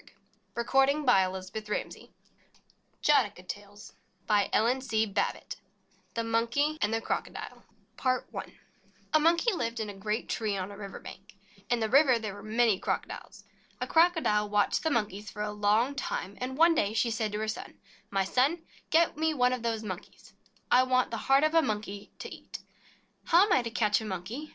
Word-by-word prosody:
Kill 235 - -1
Jataka 275 +3 +3 0.4
Tales 210 +2 -5 1.0
Jataka 210 -11 +2
Tales 205 +1 -9 2.2
THE 230 - 0
MONKEY 235 +7 0
AND 210 - +1
THE 225 - +1
CROCODILE - - -4 0.4
PART 255 -1 0
I - - -4 0.7
A 310 - +6
MONKEY 340 +8 +3
lived 230 -9 -2
in 215 -2 -3
a - - -10
great 210 +4 -3
tree 215 -3 -1
on 190 +1 -4
a - - -9
river 200 -2 -8
bank. - - -12 0.3
In 240 - +2
the 220 - 0
river 265 +1 +5
there 215 -3 -5
were 205 - -10
many 215 -1 +2
Crocodiles. - - -4 0.4
A - - -1
Crocodile 320 -12 +3
watched 205 0 +2
the 320 - 0
Monkeys 210 -6 -2
for 210 - -5
a 210 - -3
long 210 +6 +2
time, 200 -7 -4
and 260 +1 -3
one 330 +2 +6
day 210 -9 +1
she 230 +1 +2
said 220 -1 -1
to - - -1
her 220 - -2
son: 215 - -6 0.3
"My 195 -1 +1
son, 275 - +1 0.3
get 330 +1 +3
one 295 -5 +2
of 250 - -3
those 225 -1 -2
Monkeys 185 -4 -8
for - - -32
me. - - -38 0.3
I 250 - +7
want 255 -1 +2
the 230 - -2
heart 270 +5 +3
of 310 +1 +2
a 330 - +6
Monkey 210 -5 -4
to - - -7
eat." - - -9 0.7
"How 350 +4 +6
am 410 - +2
I - - +4
to 235 - -4
catch 220 -2 +1
a - - -6
Monkey?" 215 - -5
230 Hz, 175 wpm, -29 LUFS, 210-275 Hz, 2.2 s, I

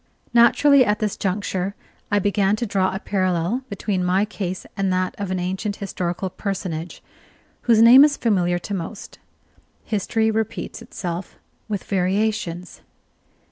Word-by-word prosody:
Naturally, 260 +4 +6
at 210 -3 +1
this 210 -2 -2
juncture, 195 0 -2 0.3
I 205 - +2
began 200 0 +2
to 235 - -3
draw 195 -3 +1
a - - -3
parallel 185 +3 0
between 200 -2 -2
my 185 +3 +2
case 190 -4 -5
and 195 -1 0
that 185 0 0
of 200 -2 -3
an 185 - -1
ancient 190 +3 -2
historical 185 -2 -3
personage, 180 -4 -5 0.7
whose 225 -1 +6
name 250 +4 +9
is 290 -1 +3
familiar 180 -6 +1
to 190 +3 -6
most. 195 +3 -6 0.6
History 220 +1 0
repeats 220 0 -3
itself 175 +1 -6 0.3
with 205 -3 -3
variations. 185 -2 -1
195 Hz, 140 wpm, -22 LUFS, 185-215 Hz, 0.7 s, name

